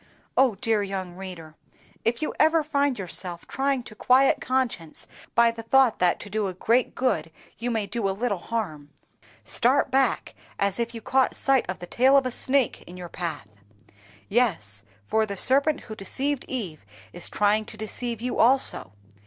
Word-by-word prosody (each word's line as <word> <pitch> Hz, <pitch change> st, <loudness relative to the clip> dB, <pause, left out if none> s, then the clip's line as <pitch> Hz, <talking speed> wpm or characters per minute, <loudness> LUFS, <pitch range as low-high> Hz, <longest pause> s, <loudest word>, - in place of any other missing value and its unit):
Oh, 260 Hz, -5 st, +4 dB
dear 225 Hz, -2 st, +1 dB
young 190 Hz, -3 st, -4 dB
reader! 180 Hz, -4 st, -8 dB, 0.5 s
if 235 Hz, +5 st, 0 dB
you -, -, -2 dB
ever 315 Hz, 0 st, +4 dB
find 285 Hz, -3 st, +1 dB
yourself 180 Hz, -2 st, -5 dB
trying 270 Hz, -2 st, 0 dB
to 235 Hz, -, -10 dB
quiet 255 Hz, +5 st, +4 dB
conscience 250 Hz, -11 st, -2 dB, 0.3 s
by 235 Hz, 0 st, +5 dB
the 230 Hz, 0 st, -8 dB
thought 255 Hz, +1 st, +3 dB
that 180 Hz, -1 st, +2 dB
to -, -, -7 dB
do 205 Hz, 0 st, -1 dB
a 185 Hz, -, -5 dB
great 235 Hz, +6 st, +1 dB
good 250 Hz, -9 st, 0 dB, 0.3 s
you 240 Hz, +1 st, -2 dB
may 220 Hz, -3 st, 0 dB
do 205 Hz, -1 st, -2 dB
a 195 Hz, +1 st, -4 dB
little 225 Hz, -6 st, 0 dB
harm, 160 Hz, -10 st, -4 dB, 0.5 s
start 265 Hz, +3 st, +2 dB
back 265 Hz, +1 st, +1 dB, 0.2 s
as 200 Hz, +1 st, 0 dB
if 235 Hz, 0 st, -2 dB
you 225 Hz, -, -6 dB
caught 260 Hz, +3 st, +2 dB
sight 270 Hz, -7 st, +2 dB
of 185 Hz, -, -3 dB
the 175 Hz, -, -8 dB
tail 260 Hz, +8 st, +4 dB
of 270 Hz, -, +3 dB
a 255 Hz, -, -1 dB
snake 260 Hz, 0 st, +1 dB
in 180 Hz, -, -10 dB
your 175 Hz, -1 st, -8 dB
path! 160 Hz, -, -5 dB, 0.8 s
Yes, 170 Hz, -, 0 dB, 0.2 s
for 220 Hz, -, +1 dB
the 200 Hz, -1 st, -5 dB
serpent 280 Hz, +7 st, +2 dB
who 220 Hz, -, -9 dB
deceived 270 Hz, +7 st, -2 dB
Eve 185 Hz, -, -5 dB, 0.3 s
is 175 Hz, -, 0 dB
trying 210 Hz, +1 st, +2 dB
to 220 Hz, -, -10 dB
deceive 225 Hz, +1 st, -4 dB
you 250 Hz, +1 st, -2 dB
also. 235 Hz, -, +3 dB
225 Hz, 180 wpm, -25 LUFS, 190-260 Hz, 0.8 s, by